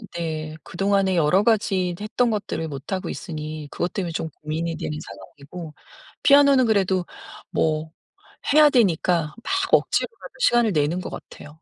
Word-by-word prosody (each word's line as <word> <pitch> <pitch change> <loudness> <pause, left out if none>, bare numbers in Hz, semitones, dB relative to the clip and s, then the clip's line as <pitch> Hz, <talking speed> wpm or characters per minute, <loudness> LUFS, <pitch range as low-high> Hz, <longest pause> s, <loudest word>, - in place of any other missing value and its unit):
네. 155 -2 -4
그동안에 195 0 +1
여러 170 +5 +3
가지 195 -5 +1
했던 230 +3 0
것들을 195 -6 -3
못하고 150 +6 -5
있으니 155 -3 -6
그것 175 0 -3
때문에 180 -4 -2
좀 160 0 -3
고민이 160 +2 -3
되는 150 - -4
상황이고 140 - -10 0.5
피아노는 280 -2 +6
그래도 190 -4 +2 0.5
뭐 155 0 0 0.6
해야 300 0 +7
되니까 175 - +2
막 385 0 -1
억지로라도 460 - +1
시간을 240 - +4
내는 155 +3 +1
것 - - -6
같아요. - - -10
180 Hz, 325 characters per minute, -23 LUFS, 155-210 Hz, 0.6 s, 해야